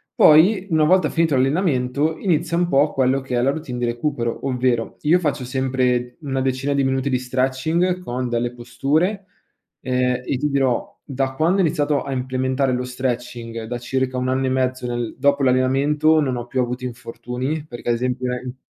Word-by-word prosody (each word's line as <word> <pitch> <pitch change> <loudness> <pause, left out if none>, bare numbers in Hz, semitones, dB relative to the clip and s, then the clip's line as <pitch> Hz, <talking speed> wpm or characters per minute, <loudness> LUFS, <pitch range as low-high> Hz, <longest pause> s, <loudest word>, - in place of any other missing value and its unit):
poi 185 +6 +5
una 155 -2 +3
volta 180 -2 +3
finito 165 -4 +1
l'allenamento, 140 +1 +1
inizia 170 -3 0
un 175 0 +1
po' 145 +1 +3
quello 130 0 +2
che 130 -2 -4
è - - +2
la 135 +2 +3
routine 140 -5 -5
di 120 - 0
recupero, 120 0 -2
ovvero: 125 -3 0
io 165 +4 +4
faccio 145 -5 -1
sempre 125 -1 -1
una 135 -2 -2
decina 130 +2 -1
di 140 -1 +1
minuti 135 +1 0
di 125 - +1
stretching 135 +8 0
con 125 -5 -3
delle 120 +1 -1
posture, 145 - -1 0.6
ehm, 125 0 0
e 135 - -1
ti 150 +2 -1
dirò, 135 -3 0 0.2
da 135 -1 -2
quando 165 +7 +1
ho - - +3
iniziato 150 -2 +1
a 135 0 -4
implementare 130 +1 -1
lo 125 0 -2
stretching, 120 -2 -4
da 120 +2 -4
circa 130 +1 -2
1 125 0 -1
anno 130 +1 0
e - - +1
mezzo 130 -1 -1
nel 120 -1 -3
dopo 140 -1 +2
l'allenamento, 140 +5 +3
non 130 -3 -1
ho 120 - -6
più 130 0 0
avuto 125 +1 -3
infortuni, 125 +4 -5
perché 120 -2 -6
ad 120 - +3
esempio 125 +1 -2
nel 125 0 -5
130 Hz, 185 wpm, -21 LUFS, 125-145 Hz, 0.6 s, poi